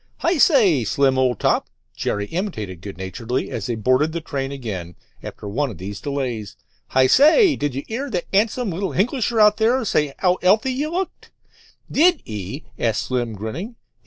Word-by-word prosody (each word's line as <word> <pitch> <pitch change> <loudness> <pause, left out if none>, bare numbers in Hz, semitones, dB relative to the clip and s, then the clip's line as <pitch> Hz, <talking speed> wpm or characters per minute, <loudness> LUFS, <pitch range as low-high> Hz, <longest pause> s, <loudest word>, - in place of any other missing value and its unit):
"Hi 340 -1 +2
say, 205 - +5
Slim, 135 +4 +2
old 125 -4 +1
top," - - +1 0.3
Jerry 105 0 -2
imitated 110 - -4
good 100 -1 -8
naturedly 115 +7 -4
as - - -4
they 120 - -1
boarded 130 +8 +2
the 170 - -2
train 135 -4 -4
again 100 -11 -6 0.3
after - - -8
one 135 +8 -1
of 110 - -9
these 100 +2 -7
delays. 125 -7 -4 0.3
"Hi 130 0 +3
say, 310 - +6
did 145 -3 -2
you 135 - -3
'ear 265 +6 -4
that 180 -7 -2
'andsome 215 +2 +1
little 190 +3 -3
Hinglisher 230 +2 0
out 210 -1 +6
there 235 +3 +2
say 150 -7 +2
as 140 - -12
'ow 180 -1 +3
'ealthy 215 +8 +3
you 295 +4 -2
looked?" 370 +2 -4 0.6
"Did 340 +1 +4
'e?" 105 - -6 0.2
asked 115 -2 0
Slim, 120 -3 -2
grinning. 135 - -6
145 Hz, 180 wpm, -21 LUFS, -, 0.6 s, say